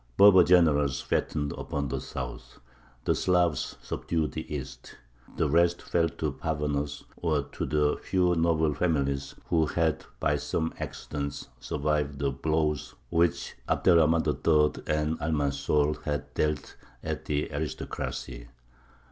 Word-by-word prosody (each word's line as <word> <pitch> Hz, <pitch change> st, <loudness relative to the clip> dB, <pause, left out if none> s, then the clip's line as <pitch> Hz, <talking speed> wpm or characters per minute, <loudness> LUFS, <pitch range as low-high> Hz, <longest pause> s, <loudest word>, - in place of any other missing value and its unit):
Berber 100 Hz, -3 st, +8 dB
generals 75 Hz, -7 st, +4 dB
fattened 70 Hz, +1 st, -1 dB
upon 70 Hz, -1 st, -3 dB
the 65 Hz, 0 st, -2 dB
South; 60 Hz, -2 st, -7 dB, 0.5 s
the -, -, +3 dB
Slavs 90 Hz, -4 st, +1 dB
subdued 80 Hz, -3 st, -2 dB
the 80 Hz, -, -6 dB
East; 70 Hz, -3 st, -7 dB, 0.4 s
"the 80 Hz, -, +2 dB
rest 85 Hz, +3 st, +3 dB
fell 85 Hz, -1 st, +1 dB
to 80 Hz, -2 st, -3 dB
parvenus 75 Hz, -1 st, -2 dB
or 80 Hz, -4 st, 0 dB
to -, -, -5 dB
the 75 Hz, -1 st, +1 dB
few 90 Hz, -2 st, +2 dB
noble 80 Hz, -2 st, +2 dB
families 70 Hz, -4 st, 0 dB, 0.2 s
who 80 Hz, -2 st, +3 dB
had 80 Hz, 0 st, 0 dB, 0.2 s
by 75 Hz, -, +2 dB
some 75 Hz, +3 st, -2 dB
accident 70 Hz, -1 st, -5 dB
survived 75 Hz, -1 st, -1 dB
the 70 Hz, 0 st, 0 dB
blows 75 Hz, +2 st, -1 dB, 0.2 s
which 85 Hz, -1 st, +1 dB, 0.2 s
Abd -, -, +2 dB
er 90 Hz, -, +7 dB
Rahmān 80 Hz, 0 st, +4 dB
III. 75 Hz, +1 st, +2 dB
and 75 Hz, +1 st, 0 dB
Almanzor 75 Hz, 0 st, 0 dB
had 75 Hz, -1 st, -3 dB
dealt 75 Hz, -2 st, -1 dB, 0.3 s
at -, -, -4 dB
the 75 Hz, 0 st, -1 dB
aristocracy. 65 Hz, -4 st, -4 dB
75 Hz, 130 wpm, -28 LUFS, 70-80 Hz, 0.5 s, Berber